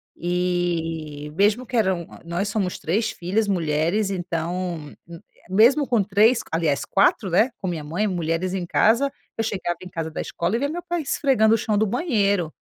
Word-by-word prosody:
e 165 -4 -2
mesmo 210 +7 +2
que 245 - -6
eram 190 -5 +1 0.2
nós 175 +4 -2
somos 195 -3 -1
3 215 +7 0
filhas 200 +5 -1
mulheres 170 +3 0
então, 175 -3 -3
m 170 -1 -10 0.3
mesmo 240 +9 +4
com 235 -5 +2
3 215 +5 +4
aliás 160 -4 0
4, 195 0 +2
né, 215 +9 +4
com 190 - -3
minha 165 -4 -3
mãe, 170 +8 -1
mulheres 175 0 -1
em 185 -2 -2
casa, 235 +10 +3 0.3
eu 225 - 0
chegava 185 -5 -2
em 185 - -9
casa 165 -2 -4
da - - -4
escola 170 +5 -2
e - - 0
via 285 +2 0
meu 345 +3 -5
pai 345 -1 -1
esfregando 260 -6 +3
o - - +1
chão 210 -1 0
do 220 - +3
banheiro. 200 - 0
185 Hz, 180 wpm, -23 LUFS, 170-220 Hz, 0.3 s, mesmo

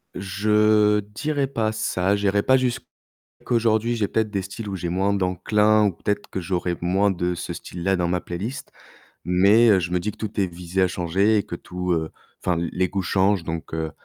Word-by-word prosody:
Je 105 +2 +3
dirais 135 +8 -2
pas 110 -5 -1
ça, 100 -3 0
j'irais 100 0 +1
pas 130 - +4
jusqu 130 -2 0 0.6
aujourd'hui, 115 0 +2
j'ai 105 -3 -1
peut-être 110 -1 0
des 100 -2 -2
styles 100 +3 -7
où 100 - -4
j'ai 85 -2 -4
moins 95 +3 +1
d'enclin, 105 +3 +2
ou 100 - +1
peut-être 105 +4 -3
que 95 - -4
j'aurais 90 0 -2
moins 95 +3 +2
de 90 -1 -1
ce - - -5
style-là 90 +2 -2
dans 85 -1 0
ma 90 - 0
playlist, 95 +10 -6 0.5
mais 100 +6 +5
heu, 100 -3 +5
je 85 -1 -3
me 90 - +1
dis 105 +3 -2
que - - -20
tout 110 0 -6
est 95 - +1
visé 90 +2 -3
à 95 - +4
changer, 95 +5 +1
et 100 - +1
que 85 - -6
tout, 90 +1 -4
heu 80 -1 -2 0.3
enfin, 90 -2 +1
l 85 - -2
les 90 0 0
goûts 100 -1 -2
changent, 95 -2 +1
donc 80 -1 -5
heu, 80 -1 -2
100 Hz, 210 wpm, -23 LUFS, 90-105 Hz, 0.6 s, mais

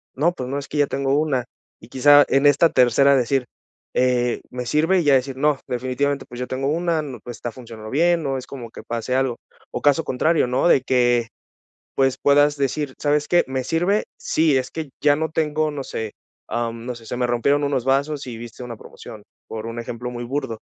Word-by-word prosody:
no, 160 +6 +2
pues 130 -7 -6
no, 140 - -2
es 140 - -8
que 150 - -4
ya 145 -1 +3
tengo 135 0 -1
una''. 135 -5 0 0.4
Y 110 - -15
quizá, 145 +3 +6
en 135 +1 +3
esta 145 +3 +5
tercera 140 +2 +4
decir, 125 +1 +1 0.5
eh: 125 -1 +1
''¿Me 125 0 -5
sirve''?, 160 +8 +2
y - - -2
ya 145 -2 +4
decir: 130 0 0
''No, 150 -1 +2
definitivamente, 130 +3 -1
pues, 120 - -9
yo 125 - -3
tengo 135 +1 -2
una. 165 0 0 0.2
Pues 120 -1 -7
está 120 - -5
funcionando 115 -3 -10
bien''. 170 +3 +2
No 135 -1 -1
es 130 - -8
como 120 -4 -8
que - - -10
pase 120 +1 -3
algo 130 -2 +1 0.4
o - - -4
caso 145 +3 +3
contrario, 155 +1 +1
¿no?, 130 +7 +1
de - - +6
que, 120 -2 +2 0.7
pues 135 -1 +2
puedas 145 +1 +4
decir: 140 0 -2
"¿Sabes 145 0 +1
qué, 175 0 +4
me 130 -1 -2
sirve?, 175 +8 +1
sí, 155 -3 +2
es 130 - -4
que 160 -3 -6
ya 145 -1 +4
no 160 +1 -2
tengo''. 155 -1 0
No 140 -2 -4
sé, 110 -2 -5 0.4
ah, 120 0 -1
mm, 115 +1 -10
no 125 - -3
sé. 115 -1 -13
Se 125 - -4
me 125 - +1
rompieron 140 +5 +1
unos 135 -4 0
vasos 140 +2 0
y 115 -2 -6
viste 120 +1 -9
una 120 -1 -7
promoción 110 -1 -12 0.2
por 110 0 -6
un 115 +1 -6
ejemplo 120 +1 -6
muy 120 0 -6
burdo. 130 -3 -3
135 Hz, 215 wpm, -22 LUFS, 125-145 Hz, 0.7 s, quizá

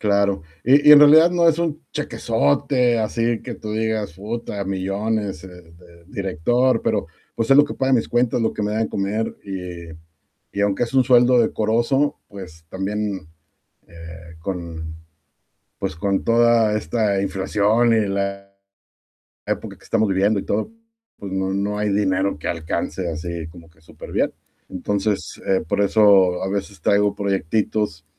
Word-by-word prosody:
Claro, 100 -3 +1 0.2
y 145 +4 +5
y - - +11
en 150 - +10
realidad 155 +3 +7
no 170 -1 +3
es 165 0 +2
un 165 -3 -2
chequesote 120 - 0
así 115 +1 -1
que 120 - -6
tú 110 -1 -7
digas: 110 -4 -2
"Uta, 105 -1 -5
millones, 100 0 -3
eh, - - -8
de 85 -1 -17
director", 110 +7 0
pero, 110 -5 -1 0.3
pues, 115 +2 -2
es 135 - +7
lo 145 - +7
que 150 - -7
paga 135 0 0
mis 120 -3 +2
cuentas, 120 0 +1
lo 110 - 0
que - - -4
me 105 0 -1
da 110 - -1
de 110 - 0
comer, 105 +3 -2
y 90 -4 -7 0.6
y - - 0
aunque 100 +3 +1
es 120 - -10
un 130 -1 +4
sueldo 125 0 +5
decoroso, 120 +6 0
pues, 90 -5 -11
también, 95 -2 -4 0.6
eh, 85 0 -12
con, 85 -3 -6 0.8
pues, 75 - -4
con 100 +3 -1
toda 115 -2 +3
esta 105 +1 0
inflación 105 +4 +1
y 110 -2 +2
la 100 0 -3 1.0
época 100 -3 -4
que 95 - -23
estamos 110 +2 +1
viviendo 100 +2 +2
y - - -6
todo, 110 - -2 0.5
pues, 100 -2 -8
no 95 0 -1
no 100 +1 -2
hay 105 0 -1
dinero 100 -2 0
que - - -5
alcance, 85 +1 -3
así 85 0 -5
como 80 0 -14
que 80 0 -27
superbién, 80 - -3 0.4
entonces, 100 +2 -3
eh, 95 -1 +1
por 100 - 0
eso 100 -3 +4
a 95 - -2
veces 100 -1 -4
traigo 100 +3 +2
proyectitos, 100 -3 -1
100 Hz, 160 wpm, -21 LUFS, 95-115 Hz, 1.0 s, y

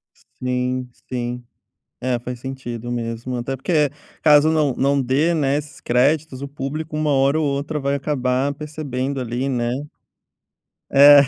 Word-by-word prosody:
S - - -26 0.2
sim, 125 0 -1 0.2
sim. 125 -1 -3 0.6
É, 125 -1 0
faz 125 +1 -6
sentido 120 -2 -5
mesmo, 120 +1 -3
até 120 +3 -2
porque, 150 +2 +2 0.3
caso 150 0 +6
não 150 -5 +2
não 140 +1 +2
dê, 140 +7 +2
né, 145 -3 +2
esses 150 0 -7
créditos, 140 +2 +1
o - - -3
público 150 +3 -4
uma 155 0 +1
hora 140 +2 +3
ou 155 - +1
outra 145 +2 -1
vai 140 0 0
acabar 135 -1 0
percebendo 140 -3 -3
ali, 125 +2 -2
né? 120 -3 0 1.2
É 140 +1 +9
135 Hz, 150 wpm, -22 LUFS, 125-145 Hz, 1.2 s, É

